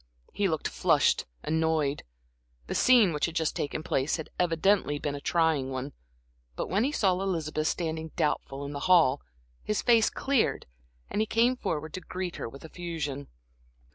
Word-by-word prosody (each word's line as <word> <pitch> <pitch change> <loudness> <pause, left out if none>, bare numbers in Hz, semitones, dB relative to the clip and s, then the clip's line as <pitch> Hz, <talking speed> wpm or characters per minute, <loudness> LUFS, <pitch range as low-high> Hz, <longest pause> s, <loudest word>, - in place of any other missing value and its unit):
He 205 - +1
looked 160 -4 -1
flushed, - - +2 0.2
annoyed; 160 -3 0 0.6
the - - -4
scene 235 -9 +5
which 150 - 0
had 165 - -8
just 160 -2 0
taken 150 +1 -3
place 135 0 0
had 160 - -7
evidently 175 -2 +2
been 145 0 -3
a 145 - -6
trying 160 -6 +1
one. 130 +1 -5 0.6
But - - -4
when 200 +4 +2
he 275 - +1
saw 200 -10 +2
Elizabeth 155 -5 -1
standing 160 -2 -2
doubtful 140 -2 -1
in 140 - -6
the 145 - -4
hall, 155 -7 +5 0.4
his 210 - -1
face 230 -2 +5
cleared 275 -4 0 0.5
and 210 - 0
he 220 - 0
came 235 +4 +3
forward 155 -9 -3
to 185 - -5
greet 180 +1 -5
her - - -5
with 140 +6 -12
effusion. 160 -5 -5
160 Hz, 170 wpm, -28 LUFS, 145-185 Hz, 0.6 s, scene